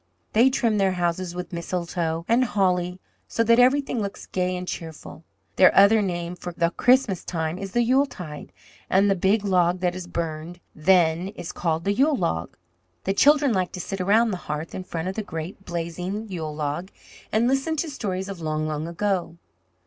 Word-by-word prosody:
"They 235 +5 +6
trim 230 -5 +1
their 190 -1 +2
houses 175 0 -2
with 180 0 -6
mistletoe 170 -1 -2
and 235 +3 +4
holly 180 -5 0 0.3
so 230 - 0
that 230 +1 +4
everything 260 -1 +3
looks 200 -1 -5
gay 180 0 -1
and 180 0 -6
cheerful. 160 -1 -7 0.3
Their 185 - +7
other 205 +3 +7
name 175 -2 -3
for 180 - -7
the 170 0 +1
Christmas 245 -4 +3
time 165 0 -3
is 195 -1 -6
the 240 - +3
Yuletide, 235 - -1 0.4
and 195 +2 +4
the - - +3
big 195 +3 +2
log 180 -2 +2
that 180 -1 +1
is 180 -1 -7
burned 165 0 -4
then 170 +1 +3
is 195 -4 -7
called 165 -1 -1
the 200 +2 +1
Yule 280 +7 +3
log. 80 - -2 0.5
The 195 - 0
children 285 +3 +4
like 185 -3 0
to 185 - -5
sit 195 +2 -4
around 220 +5 +3
the 185 - -2
hearth 150 +2 -4
in 185 - -6
front 165 -1 -4
of 190 - -2
the 220 - -3
great, 180 +1 -7
blazing 180 +5 -4
Yule 160 -5 -4
log, 150 +5 -3 0.4
and 225 +3 +2
listen 270 +5 +1
to 320 +2 -1
stories 190 -7 -3
of 195 -3 -7
long, 155 -1 -1
long 155 +1 -3
ago. 170 -1 -2
185 Hz, 185 wpm, -24 LUFS, 170-210 Hz, 0.5 s, Their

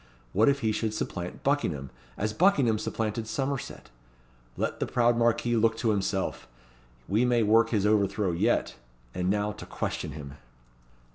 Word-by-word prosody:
What 110 +7 +4
if 140 0 +1
he 110 -2 +1
should 110 0 -2
supplant 90 -4 -5
Buckingham, 85 - 0 0.3
as 105 +1 -1
Buckingham 135 - +3
supplanted 110 0 -3
Somerset? 135 - -4 0.7
Let - - -2
the - - -1
proud 120 0 +3
Marquis 120 0 +2
look 110 0 +2
to 115 -1 +1
himself! 95 -1 -2 0.6
We 105 +5 +2
may 120 -2 +3
work 115 +2 +4
his 105 -4 +1
overthrow 100 -2 +2
yet. 85 - +1 0.4
And 90 0 -1
now 105 +1 +1
to - - -9
question - - -4
him." 70 -2 -9
110 Hz, 150 wpm, -28 LUFS, 100-120 Hz, 0.7 s, What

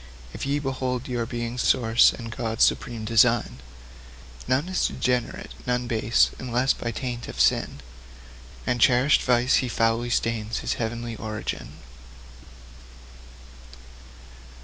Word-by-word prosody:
If - - -5
ye 140 +1 +1
behold 130 -3 -3
your 120 -2 -2
being's 120 0 -4
source, 115 -1 +4
and 115 -1 -8
God's 115 -2 0
supreme 115 -3 0
design, 115 - +3 0.9
None 135 +6 +1
is 185 0 0
degenerate, 125 -1 -2 0.2
none 125 0 0
base, 115 -1 +2
unless 125 +1 +1
by 120 - -5
taint 120 0 -5
of - - -8
sin 70 - +2 0.8
And 125 -1 -1
cherished 125 +5 +4
vice 125 0 +3
he 130 - -1
foully 115 +1 +1
stain 115 -2 -1
his - - -2
heavenly 115 0 -4
origin. 110 -1 -5
120 Hz, 120 wpm, -25 LUFS, 115-125 Hz, 0.9 s, source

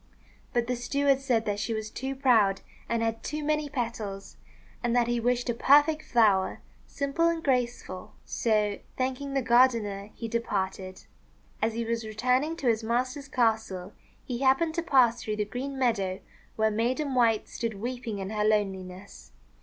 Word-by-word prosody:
But 240 -1 +1
the 250 +1 -1
steward 275 +3 +1
said 245 -5 0
that 205 -1 -1
she 225 +2 -2
was 215 0 -5
too 265 +3 -4
proud 225 -8 +3 0.3
and 230 -1 0
had 225 0 -1
too 305 0 -4
many 300 0 0
petals, 225 -7 -4 0.5
and 240 0 +1
that 240 -1 +4
he 240 0 0
wished 245 +1 0
a 240 - +1
perfect 295 +6 +4
flower, 210 -8 +2 0.3
simple 280 +4 0
and 335 -1 0
graceful; 245 -8 -2
so 210 -3 0 0.2
thanking 265 +2 -2
the 270 - +1
gardener, 230 -5 +3
he 230 - -5
departed. 190 -5 -3 0.6
As 220 0 0
he 230 0 -2
was 230 0 -2
returning 250 +8 0
to 280 - -3
his 225 -1 +2
master's 255 +5 -1
castle, 220 -7 0 0.3
he 245 -2 -4
happened 275 +5 +3
to 335 - -1
pass 250 -8 +3
through 215 -1 -3
the 210 0 -1
green 265 +5 -5
meadow 200 -8 0 0.3
where 220 0 +2
Maiden 255 +6 0
White 230 -4 +3
stood 230 -3 -4
weeping 240 0 -4
in 195 +1 -5
her 210 -1 0
loneliness. 195 -3 -2
235 Hz, 165 wpm, -28 LUFS, 215-265 Hz, 0.6 s, that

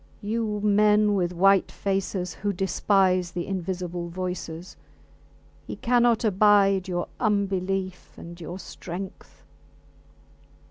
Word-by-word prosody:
You 210 -1 -2
men 210 0 +4
with 180 -3 0
white 195 +2 +3
faces 195 -2 -2
who 205 0 -2
despise 185 -1 +1
the 175 -1 -3
invisible 180 -2 -4
voices. 180 -1 -5 0.9
He - - -5
cannot 240 -1 +2
abide 195 -2 +4
your 175 -1 -2
unbelief 195 -3 -1
and 170 +1 -10
your 175 +2 -6
strength. 190 +1 -9
190 Hz, 100 wpm, -25 LUFS, 180-205 Hz, 0.9 s, men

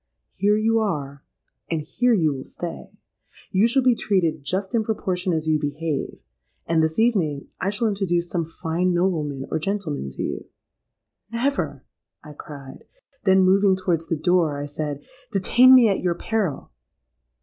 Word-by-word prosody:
Here 205 +1 +2
you 225 +1 +2
are, 140 -10 -3 0.5
and 165 - 0
here 240 +9 +2
you 160 -6 +2
will 130 -1 -6
stay. 175 -1 -7 0.6
You 200 +3 +4
shall 260 +3 +2
be 250 -1 +5
treated 170 -9 0
just 190 +6 -3
in 230 -2 +2
proportion 185 -4 -2
as 160 -1 -1
you 155 -1 +2
behave; 150 +1 -3 0.5
and 165 -1 +2
this 160 0 0
evening, 180 -12 +1
I 185 - 0
shall 210 +3 0
introduce 180 -4 0
some 170 -1 -2
fine 165 +2 -1
nobleman 155 -7 -1
or - - 0
gentleman 160 - -3
to 65 - -5
you.'—'Never!' 230 - -5 0.4
I 150 -1 -11
cried: 140 -3 -11 0.4
then 190 -1 +5
moving 190 +1 +4
towards 175 -3 -1
the 165 - -1
door, 170 -3 +2
I 145 - -3
said, 145 -1 -5 0.3
'Detain 245 +6 +6
me 245 -3 +7
at 195 - +1
your 175 -1 0
peril!' 195 - -2
175 Hz, 155 wpm, -23 LUFS, 155-205 Hz, 0.6 s, me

